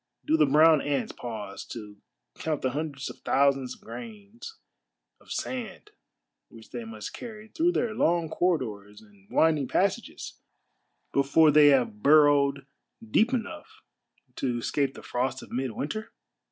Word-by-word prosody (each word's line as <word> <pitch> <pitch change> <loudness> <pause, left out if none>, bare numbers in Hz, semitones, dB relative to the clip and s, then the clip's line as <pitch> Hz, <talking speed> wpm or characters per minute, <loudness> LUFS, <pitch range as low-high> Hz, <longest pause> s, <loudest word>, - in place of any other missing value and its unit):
Do 155 - +3
the 155 -2 +4
brown 155 +1 +6
ants 145 -2 -1
pause 110 -4 -7
to 105 -3 -9 0.4
count 155 -3 -3
the 130 - +1
hundreds 140 -1 -4
of - - -16
thousands 135 -2 +1
of - - -24
grains 230 - -10 0.6
of - - -17
sand 255 - -5 0.6
which 115 -1 -15
they 120 -2 -6
must 110 -2 -8
carry 220 -2 -9
through 340 +9 +1
their 230 -8 0
long 170 -4 +1
corridors 110 - -2
and 100 -2 -22
winding 155 -4 +2
passages - - -2 0.7
before 140 +3 +4
they 150 0 +7
have 125 -7 +3
burrowed 140 -1 +4 0.5
deep 225 +3 +3
enough 235 -5 -5 0.5
to 125 -3 -1
escape 135 +3 -1
the - - -11
frost 130 +1 -2
of - - -14
midwinter? 135 - -4
140 Hz, 140 wpm, -27 LUFS, 125-170 Hz, 0.7 s, they